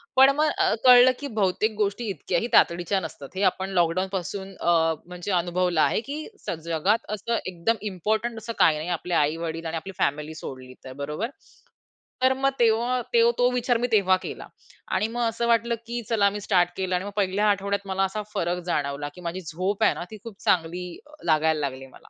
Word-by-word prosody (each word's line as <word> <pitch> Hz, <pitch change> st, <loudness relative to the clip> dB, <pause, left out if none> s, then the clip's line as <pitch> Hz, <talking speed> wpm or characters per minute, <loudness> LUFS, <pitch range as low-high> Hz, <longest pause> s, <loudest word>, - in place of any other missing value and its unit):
पण 265 Hz, +1 st, +8 dB
मग 305 Hz, 0 st, +3 dB
अ, 380 Hz, -2 st, +3 dB
कळलं, 250 Hz, 0 st, +9 dB
की 285 Hz, -, -4 dB
बहुतेक 205 Hz, +3 st, +1 dB
गोष्टी 205 Hz, +4 st, -1 dB
इतक्या 180 Hz, -2 st, -1 dB
ही 235 Hz, -, -2 dB
तातडीच्या 175 Hz, +3 st, +3 dB
नसतात. 145 Hz, -4 st, -8 dB
हे 190 Hz, -, -2 dB
आपण 190 Hz, +1 st, -6 dB
लॉकडाउनपासून 190 Hz, +2 st, -1 dB
अ, 175 Hz, -, +2 dB, 0.3 s
म्हणजे 180 Hz, +2 st, -6 dB
अनुभवलं 175 Hz, -2 st, 0 dB
आहे, 220 Hz, -, +2 dB
की 285 Hz, +4 st, -6 dB, 0.3 s
स -, -, 0 dB, 0.2 s
जगात 195 Hz, +8 st, +1 dB
असं 230 Hz, +3 st, -2 dB
एकदम 200 Hz, +7 st, 0 dB
इम्पोर्टंट 220 Hz, +5 st, -1 dB
असं 230 Hz, -, -4 dB
काही 155 Hz, -2 st, +4 dB
नाही. 160 Hz, +4 st, -4 dB
आपले 180 Hz, -, -5 dB
आई-वडील 165 Hz, +1 st, -4 dB
आणि 165 Hz, 0 st, -2 dB
आपली 195 Hz, -, -8 dB
फॅमिली 150 Hz, +1 st, -1 dB
सोडली 130 Hz, -1 st, -8 dB
तर, 130 Hz, -, -8 dB
बरोबर? 155 Hz, -, -3 dB, 0.9 s
तर 260 Hz, 0 st, +5 dB
मग 270 Hz, +1 st, +1 dB
तेव्हा 240 Hz, +2 st, +2 dB
तो 470 Hz, 0 st, +5 dB
तो 245 Hz, 0 st, +4 dB
विचार 245 Hz, -1 st, +1 dB
मी 245 Hz, +1 st, 0 dB
तेव्हा 190 Hz, -3 st, +4 dB
केला. -, -, -6 dB, 0.5 s
आणि 215 Hz, -, +1 dB
मग 240 Hz, -, -1 dB
असं 235 Hz, +1 st, -2 dB
वाटलं, 235 Hz, 0 st, +2 dB
की 240 Hz, 0 st, -3 dB
चला 205 Hz, -3 st, +3 dB
मी -, -, -3 dB
स्टार्ट 180 Hz, -3 st, +2 dB
केलं 185 Hz, -1 st, -1 dB
आणि 180 Hz, +2 st, -2 dB
मग 205 Hz, -, -5 dB
1ल्या 200 Hz, +1 st, +1 dB
आठवड्यात 200 Hz, 0 st, -1 dB
मला 190 Hz, 0 st, 0 dB
असा 210 Hz, +3 st, -3 dB
फरक 180 Hz, -2 st, -1 dB
जाणवला, 145 Hz, -1 st, -1 dB
की 180 Hz, -, -11 dB
माझी 185 Hz, +3 st, -4 dB
झोप 185 Hz, +7 st, -2 dB
आहे -, -, +5 dB
ना, -, -, -6 dB
ती 215 Hz, -, -8 dB
खूप 225 Hz, -4 st, -10 dB
चांगली 175 Hz, +1 st, +1 dB, 0.2 s
अ, -, -, -19 dB, 0.2 s
लागायला 155 Hz, 0 st, +3 dB
लागली 135 Hz, 0 st, -10 dB
मला. -, -, -18 dB
190 Hz, 200 wpm, -25 LUFS, 170-230 Hz, 0.9 s, कळलं